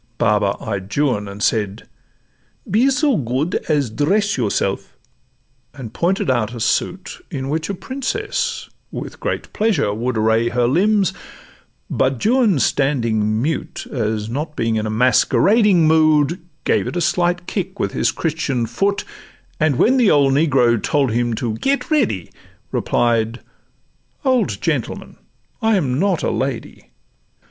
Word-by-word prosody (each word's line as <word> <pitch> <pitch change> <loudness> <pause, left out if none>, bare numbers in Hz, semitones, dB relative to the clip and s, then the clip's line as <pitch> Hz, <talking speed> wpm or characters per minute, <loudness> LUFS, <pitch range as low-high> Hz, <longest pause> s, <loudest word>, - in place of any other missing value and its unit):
Baba 105 -1 +2
eyed 100 -3 -5
Juan, 125 -9 +1
and 100 +1 -6
said, 105 -1 -1 0.8
'Be 230 +8 +3
so 280 -2 +2
good 130 +6 -1
As 145 -7 +1
dress 200 - +1
yourself 100 -5 -2 0.4
' 125 +1 -43
and 125 -6 -8
pointed 185 +3 0
out 120 -3 0
a - - -6
suit 180 +10 -2
In 135 -5 -4
which 160 +3 -2
a 200 - -2
Princess 420 - -3 0.2
with - - -7
great - - -4
pleasure 195 - +1
would 120 +2 -2
Array 110 +2 +2
her 120 0 +1
limbs; 195 - +2 0.7
but 130 - 0
Juan 230 - +3
standing 115 -6 +1
mute, 155 +1 -3
As 110 -4 -2
not 150 +6 -4
being 115 -3 0
in 110 0 -1
a - - -3
masquerading 170 - +3
mood, 155 +1 +3 0.2
Gave - - +1
it - - -5
a - - 0
slight 175 +1 +1
kick 190 0 -4
with - - -1
his - - +1
Christian 150 -7 -1
foot; 200 - -1 0.5
And 155 -3 +2
when 255 - +3
the 240 -5 +4
old 140 -2 +4
negro 130 -6 +3
told 140 0 +1
him 120 0 0
to 115 -1 -2
'Get 275 - -1
ready,' 225 - 0 0.4
Replied, 115 0 0 0.8
'Old 255 -3 +1
gentleman, - - -3 0.4
I'm 180 - +1
not 190 -3 +1
a - - +1
lady. 130 -3 -4
140 Hz, 140 wpm, -19 LUFS, 115-190 Hz, 0.8 s, the